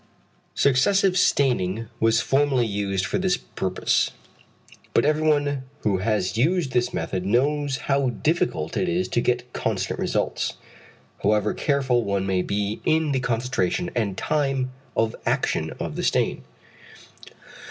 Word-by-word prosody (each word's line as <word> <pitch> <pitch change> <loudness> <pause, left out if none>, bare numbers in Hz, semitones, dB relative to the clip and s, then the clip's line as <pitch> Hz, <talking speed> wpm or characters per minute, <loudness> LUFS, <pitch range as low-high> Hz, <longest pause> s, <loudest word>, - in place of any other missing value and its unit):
Successive 180 +8 +3
staining 115 - +2
was 115 0 +3
formerly 135 -3 +2
used 100 -3 -1
for 95 - -1
this 185 -1 +1
purpose. 95 -1 0 0.9
But - - +4
everyone 150 -2 +2 0.2
who 100 -3 +1
has 105 0 0
used 160 +1 +2
this 125 -1 +1
method 95 -5 -3
knows 140 +6 +1
how 140 -2 +2
difficult 165 +8 -1
it 185 - 0
is 175 +2 0
to 120 - +1
get 125 0 -1
constant 95 -4 -2
results, - - -1 0.7
however 105 +1 +2
careful 130 -4 +1
one 100 -2 -1
may 95 -1 +1
be 105 +2 -2
in 160 -1 +2
the 135 - +1
concentration 120 -8 -1
and 105 -6 -1
time 135 -3 0 0.3
of 110 0 +1
action - - 0
of - - -4
the - - -3
stain. - - +1
125 Hz, 130 wpm, -24 LUFS, 105-145 Hz, 0.9 s, But